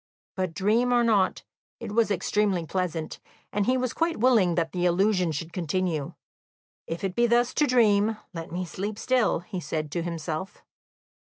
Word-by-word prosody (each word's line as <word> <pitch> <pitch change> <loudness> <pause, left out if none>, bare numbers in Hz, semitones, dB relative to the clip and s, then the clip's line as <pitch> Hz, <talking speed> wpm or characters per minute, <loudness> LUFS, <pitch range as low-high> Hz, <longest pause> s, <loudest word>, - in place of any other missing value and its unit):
But, 185 -4 -2
dream 220 +5 +2
or 240 -1 +4
not, 210 -5 +2 0.4
it 230 -3 -6
was 225 +1 +2
extremely 195 -2 0
pleasant, 170 -2 -3 0.3
and 205 -1 0
he 255 +1 +3
was 255 -1 -1
quite 330 0 0
willing 215 -8 +4
that 165 -2 0
the 180 -1 -1
illusion 185 -1 +2
should 160 +3 -5
continue. 170 -4 -2 0.7
"If 165 +4 -5
it 190 -2 -1
be 240 +4 +3
thus 240 +1 +2
to 295 - +2
dream, 220 -3 +3 0.2
let 165 -1 -7
me 180 +2 -3
sleep 200 +5 -5
still," 250 -8 +1
he 185 +1 -6
said 155 -3 -4
to 170 - -1
himself. 165 +1 -5
190 Hz, 170 wpm, -26 LUFS, 170-225 Hz, 0.7 s, or